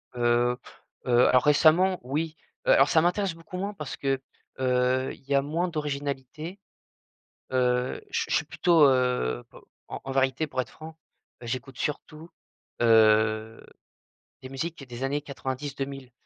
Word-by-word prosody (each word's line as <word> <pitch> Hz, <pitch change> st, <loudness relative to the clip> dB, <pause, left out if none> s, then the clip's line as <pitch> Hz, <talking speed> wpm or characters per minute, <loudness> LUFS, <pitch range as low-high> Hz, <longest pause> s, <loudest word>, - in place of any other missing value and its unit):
Heu 120 Hz, 0 st, +2 dB, 0.5 s
heu, 120 Hz, -1 st, +3 dB
alors 125 Hz, -1 st, +4 dB
récemment 165 Hz, +5 st, +4 dB
oui. 155 Hz, +5 st, -2 dB, 0.3 s
Heu -, -, +6 dB
alors -, -, +5 dB
ça 160 Hz, -, +4 dB
m'intéresse 180 Hz, +2 st, +1 dB
beaucoup 175 Hz, +3 st, -9 dB
moins 200 Hz, +3 st, -3 dB
parce 150 Hz, -8 st, -6 dB
que, 135 Hz, -1 st, 0 dB, 0.4 s
heu, 130 Hz, 0 st, +1 dB
il -, -, -16 dB
y 140 Hz, +1 st, -1 dB
a 140 Hz, -, +4 dB
moins 160 Hz, +6 st, -1 dB
d'originalité. 150 Hz, +2 st, -4 dB, 0.9 s
Heu, 125 Hz, -1 st, +1 dB
je -, -, 0 dB
suis -, -, -6 dB
je -, -, +3 dB
suis -, -, +1 dB
plutôt, 170 Hz, -4 st, +3 dB
heu, 125 Hz, -, +1 dB
p -, -, -14 dB, 0.3 s
en -, -, -6 dB
en 135 Hz, -, -5 dB
vérité, 135 Hz, +3 st, +1 dB
pour 130 Hz, -, -2 dB
être 130 Hz, -, -5 dB
franc, 160 Hz, 0 st, -11 dB, 0.4 s
bah, 120 Hz, -, -9 dB
j'écoute 130 Hz, +1 st, -5 dB
surtout, 155 Hz, +2 st, -5 dB, 0.5 s
heu, 110 Hz, -1 st, +3 dB, 0.8 s
des 130 Hz, -, -9 dB
musiques 140 Hz, +1 st, -5 dB
des 120 Hz, +1 st, -7 dB
années 140 Hz, +2 st, -1 dB
90-2000. 135 Hz, -1 st, -5 dB
135 Hz, 155 wpm, -27 LUFS, 125-155 Hz, 0.9 s, Heu